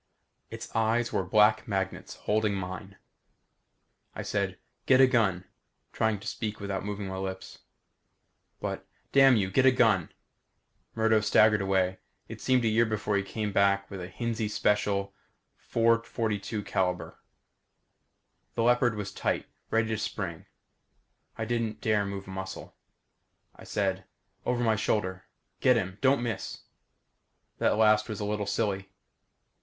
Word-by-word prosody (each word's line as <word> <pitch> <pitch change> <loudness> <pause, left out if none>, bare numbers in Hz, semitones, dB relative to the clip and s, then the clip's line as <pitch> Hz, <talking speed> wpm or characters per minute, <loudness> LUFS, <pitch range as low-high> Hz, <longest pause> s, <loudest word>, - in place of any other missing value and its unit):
It's - - -8
eyes 115 +2 +1
were - - +1
black 105 +4 +4
magnets, 95 -2 -3
holding 105 -1 0
mine. 95 +1 -6 1.2
I - - -4
said, - - -2 0.3
"Get 130 - +6
a 135 - +9
gun," 110 -8 +2 0.5
trying 110 -2 +1
to - - -11
speak 105 -2 -4
without 100 -2 -3
moving 105 0 -4
my 95 0 -5
lips. 95 0 -6 1.0
"But - - -4
" - - -42
"Damn 135 -2 +7
you 95 -4 0
get 130 +6 +4
a - - +8
gun!" 110 -9 +3 0.8
Murdo 110 -1 +3
staggered 105 0 +4
away. 95 -1 +1 0.3
It - - -9
seemed 130 -2 +2
a - - +4
year 110 +1 +3
before 105 -1 -1
he 100 - +2
came 105 +1 -3
back 100 0 +2
with 95 -2 -6
a 90 - -5
Hinzie 110 +3 -2
Special 100 -2 0 0.6
.442. 110 -5 0 1.4
The 115 - +1
leopard 120 -1 +3
was 105 -2 -4
tight, - - -1 0.2
ready 115 0 +1
to 110 -1 -1
spring. 90 -6 -4 0.9
I 110 - -2
didn't 115 -2 -2
dare 105 -2 +1
move 100 0 -5
a - - -8
muscle. 95 0 -7 0.8
I - - -13
said, 95 -2 -1 0.4
"Over 125 0 +1
my 110 -2 +3
shoulder. 95 -3 -1 0.3
Get 125 - +5
him. 95 -2 -3
Don't 135 -2 +3
miss." 115 -2 -4 1.0
That - - +2
last 110 0 +4
was 110 - -4
a 105 - -2
little 105 -1 -2
silly. 100 -2 -1
105 Hz, 140 wpm, -28 LUFS, 95-115 Hz, 1.4 s, a